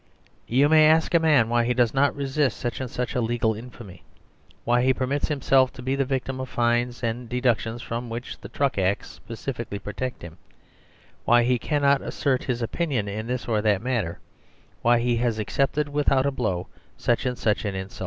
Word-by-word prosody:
You 135 Hz, +5 st, +4 dB
may 155 Hz, 0 st, +6 dB
ask 160 Hz, +2 st, +3 dB
a 170 Hz, -, +6 dB
man 150 Hz, -8 st, +4 dB
why 120 Hz, 0 st, +2 dB
he 120 Hz, +1 st, 0 dB
does 120 Hz, -2 st, +2 dB
not 140 Hz, +1 st, +2 dB
resist 140 Hz, 0 st, 0 dB
such 120 Hz, +1 st, -4 dB
and 130 Hz, -, -4 dB
such 125 Hz, 0 st, -3 dB
a 125 Hz, -, 0 dB
legal 115 Hz, -1 st, 0 dB
infamy; 110 Hz, -5 st, -11 dB, 0.6 s
why 120 Hz, +1 st, +2 dB
he 130 Hz, +1 st, +3 dB
permits 135 Hz, +2 st, -1 dB
himself 135 Hz, -3 st, +3 dB
to 125 Hz, -, -10 dB
be 130 Hz, +2 st, 0 dB
the 135 Hz, 0 st, 0 dB
victim 130 Hz, 0 st, -3 dB
of 130 Hz, -1 st, -5 dB
fines 120 Hz, +1 st, 0 dB
and 115 Hz, +1 st, -3 dB
deductions 120 Hz, -1 st, 0 dB
from 115 Hz, +1 st, -4 dB
which 120 Hz, +2 st, -6 dB
the -, -, -9 dB
Truck 140 Hz, -7 st, 0 dB
Acts 95 Hz, +1 st, 0 dB
specifically 115 Hz, -2 st, -6 dB
protect 105 Hz, +5 st, -5 dB
him; 85 Hz, -1 st, -10 dB, 0.8 s
why 120 Hz, 0 st, +4 dB
he 125 Hz, 0 st, +2 dB
cannot 140 Hz, -1 st, +2 dB
assert 130 Hz, -2 st, -1 dB
his 120 Hz, -2 st, -2 dB
opinion 130 Hz, -4 st, -1 dB
in 110 Hz, +3 st, -4 dB
this 125 Hz, 0 st, -3 dB
or 110 Hz, -3 st, +1 dB
that 105 Hz, -1 st, +1 dB
matter; 115 Hz, -10 st, -1 dB, 0.6 s
why 120 Hz, +1 st, +4 dB
he 120 Hz, 0 st, +1 dB
has 115 Hz, -2 st, 0 dB
accepted, 140 Hz, +7 st, 0 dB
without 140 Hz, -2 st, +1 dB
a 140 Hz, -, +1 dB
blow, 95 Hz, -9 st, -2 dB, 0.3 s
such 120 Hz, +2 st, 0 dB
and 125 Hz, -1 st, -2 dB
such 105 Hz, -3 st, 0 dB
an 100 Hz, -2 st, -3 dB
insult. 95 Hz, 0 st, -7 dB
125 Hz, 195 wpm, -25 LUFS, 115-135 Hz, 0.8 s, may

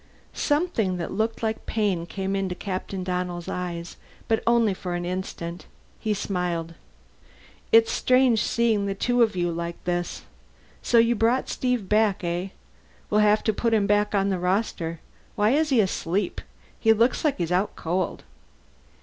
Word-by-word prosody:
Something 290 Hz, -, 0 dB
that 170 Hz, -, -4 dB
looked 220 Hz, +3 st, -2 dB
like 220 Hz, 0 st, -2 dB
pain 195 Hz, -6 st, 0 dB
came 195 Hz, +1 st, -3 dB
into 190 Hz, -2 st, -2 dB
Captain 190 Hz, 0 st, -4 dB
Donnell's 180 Hz, -1 st, -3 dB
eyes, 175 Hz, -1 st, -5 dB, 0.3 s
but 225 Hz, -1 st, +1 dB
only 235 Hz, -3 st, +4 dB
for 180 Hz, -1 st, -4 dB
an 175 Hz, 0 st, -3 dB
instant. 175 Hz, -1 st, -5 dB, 0.3 s
He 215 Hz, -1 st, -1 dB
smiled. 175 Hz, -4 st, -2 dB, 1.0 s
"It's 225 Hz, 0 st, +6 dB
strange, 255 Hz, -3 st, +3 dB
seeing 225 Hz, -4 st, +1 dB
the 195 Hz, -, -2 dB
two 245 Hz, +4 st, +1 dB
of 220 Hz, -4 st, +3 dB
you 175 Hz, -1 st, 0 dB
like 170 Hz, 0 st, -4 dB
this. 175 Hz, 0 st, -2 dB, 0.6 s
So 240 Hz, -, +2 dB
you 230 Hz, +1 st, +5 dB
brought 235 Hz, +3 st, +2 dB
back -, -, -12 dB
Steve, 245 Hz, -6 st, -1 dB
eh? 190 Hz, -4 st, +1 dB, 0.6 s
We'll 210 Hz, 0 st, +4 dB
have 210 Hz, 0 st, +4 dB
to 220 Hz, -, +1 dB
put 230 Hz, +2 st, +1 dB
him 205 Hz, -2 st, +2 dB
back 205 Hz, 0 st, +2 dB
on 195 Hz, 0 st, +2 dB
the 190 Hz, -2 st, -1 dB
roster. 180 Hz, -3 st, -1 dB, 0.3 s
Why 210 Hz, +1 st, +3 dB
is 305 Hz, +3 st, +2 dB
he 260 Hz, -4 st, +3 dB
asleep? 190 Hz, -1 st, 0 dB, 0.4 s
He 225 Hz, -1 st, +5 dB
looks 230 Hz, +3 st, +2 dB
like 300 Hz, -4 st, +1 dB
he's 170 Hz, -1 st, -2 dB
out 185 Hz, +3 st, +1 dB
cold." 180 Hz, +2 st, -2 dB
200 Hz, 160 wpm, -25 LUFS, 180-225 Hz, 1.0 s, It's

